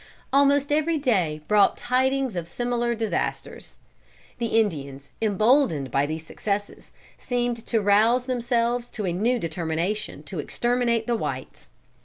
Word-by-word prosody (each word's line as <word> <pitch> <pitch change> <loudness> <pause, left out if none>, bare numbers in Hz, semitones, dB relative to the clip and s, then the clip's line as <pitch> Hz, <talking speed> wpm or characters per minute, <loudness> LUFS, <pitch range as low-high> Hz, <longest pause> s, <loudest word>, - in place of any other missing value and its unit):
Almost 280 +1 +4
every 310 +2 +2
day 185 - 0
brought 210 -1 +4
tidings 260 -1 0
of 170 -2 -3
similar 240 +4 -1
disasters. 225 -1 -3 0.6
The 235 - 0
Indians, 140 -9 -3
emboldened 215 - +2
by 140 +1 +1
these 160 +1 -5
successes, 205 +4 -4 0.3
seemed 240 -2 -2
to 230 - +2
rouse 220 +5 +4
themselves 240 -1 0
to 210 - -2
a 175 - -1
new 230 +8 +1
determination 170 +3 -3
to - - -6
exterminate 240 -2 0
the 240 - 0
whites. - - -5
230 Hz, 130 wpm, -25 LUFS, 185-245 Hz, 0.6 s, Almost